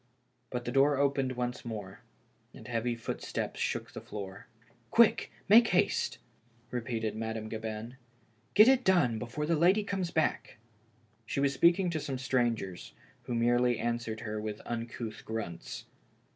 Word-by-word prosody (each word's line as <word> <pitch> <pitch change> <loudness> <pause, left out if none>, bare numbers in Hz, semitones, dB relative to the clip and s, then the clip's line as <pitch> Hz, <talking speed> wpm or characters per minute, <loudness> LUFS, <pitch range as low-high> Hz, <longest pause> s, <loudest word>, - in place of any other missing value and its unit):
But 125 0 -4
the 120 - -2
door 140 +2 +4
opened 140 -2 +1
once 125 0 -3
more, 105 -5 -6 0.6
and - - -11
heavy 120 0 -1
footsteps 115 - -4
shook - - -2
the - - -8
floor. 100 +1 -8 0.2
" 120 - -31
Quick, 235 - +4 0.2
make 230 +3 +8
haste," 180 - +1 0.5
repeated 115 -3 -2
Madame 110 0 -4
Gabin. 110 +2 -5 0.3
" 110 0 -37
Get 215 +2 +9
it 260 -1 +5
done 155 - +3
before 120 +6 -3
the 165 +2 +2
lady 185 +7 +4
comes 195 -3 -2
back." 160 -6 -1 0.7
She - - -2
was 140 0 +2
speaking 175 +4 +4
to 160 - -1
some 135 -3 -3
strangers, 120 -8 -1 0.3
who 120 - -2
merely 120 +1 +3
answered 115 -2 -2
her 110 -1 -4
with 105 -1 -4
uncouth 115 -1 -5
grunts. 105 -7 -5
120 Hz, 150 wpm, -31 LUFS, 110-145 Hz, 0.7 s, Get